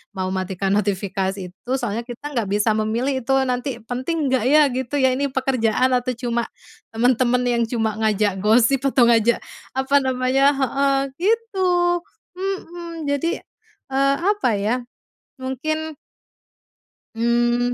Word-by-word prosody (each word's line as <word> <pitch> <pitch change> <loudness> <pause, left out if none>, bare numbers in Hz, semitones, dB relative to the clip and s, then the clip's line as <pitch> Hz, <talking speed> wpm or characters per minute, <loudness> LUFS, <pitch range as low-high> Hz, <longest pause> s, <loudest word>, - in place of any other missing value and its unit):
mau 185 -1 -2
matikan 190 +1 -1
notifikasi 195 -1 -1
itu, 245 +6 -10
soalnya 230 -1 -2
kita 290 +5 -7
nggak 225 -4 0
bisa 210 +2 +2
memilih 240 +5 -1
itu 270 - 0
nanti 250 0 -2
penting 270 +5 -2
nggak 260 -4 +2
ya, 305 +3 +6
gitu 260 +2 -3
ya. 260 -1 +4
Ini 280 0 -1
pekerjaan 255 -1 +1
atau 250 0 0
cuma 240 -1 -1 0.5
temen-temen 245 +1 +2 0.2
yang - - +3
cuma 220 -3 -1
ngajak 210 -2 +1
gosip 235 +5 +4
atau 255 -2 +4
ngajak, 230 0 +4 0.4
apa 265 +1 0
namanya 260 +2 +2
heeh, 275 +1 +1 0.3
gitu, 430 -3 +1 0.7
mhm, 345 -4 -5
jadi, 285 +4 0 0.5
eee, 275 +1 +3 0.2
apa 410 - 0
ya, 215 +4 +1 0.7
mungkin 310 +4 -3 1.2
mmm, 240 +1 +2
250 Hz, 130 wpm, -21 LUFS, 225-275 Hz, 1.2 s, ya